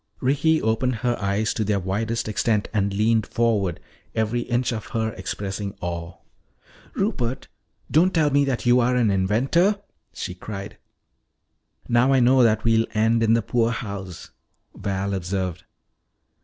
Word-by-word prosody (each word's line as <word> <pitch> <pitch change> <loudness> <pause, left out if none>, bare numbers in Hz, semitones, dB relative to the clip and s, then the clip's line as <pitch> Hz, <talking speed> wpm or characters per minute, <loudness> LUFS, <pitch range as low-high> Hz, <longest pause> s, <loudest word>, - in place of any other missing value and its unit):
Ricky 145 +5 +2
opened 115 +3 0
her 120 -1 +2
eyes 100 +3 0
to 110 - -1
their 105 -1 0
widest 110 +6 -2
extent 110 0 0
and 100 -2 +1
leaned 110 +2 +1
forward, 105 -7 0 0.4
every 110 +2 0
inch 120 +1 -1
of 110 -3 -5
her 110 -1 -2
expressing 100 +1 -5
awe. 85 0 -5 0.8
"Rupert, 135 - -2 0.4
don't 165 +8 +4
tell 155 -4 +2
me 140 +1 +4
that 130 -3 -2
you 120 +1 +5
are 125 +1 +2
an 115 -4 +3
inventor!" 130 - +2 0.3
she 90 - -5
cried. 100 +2 -8 1.1
"Now 120 +3 +3
I 135 - +4
know 130 +1 +5
that 110 -2 +3
we'll 115 -1 +3
end 115 +2 +3
in 115 0 +4
the 115 - +1
poorhouse," 100 -6 -3 0.4
Val 100 0 -2
observed. 95 -1 -3
110 Hz, 140 wpm, -23 LUFS, 100-120 Hz, 1.1 s, you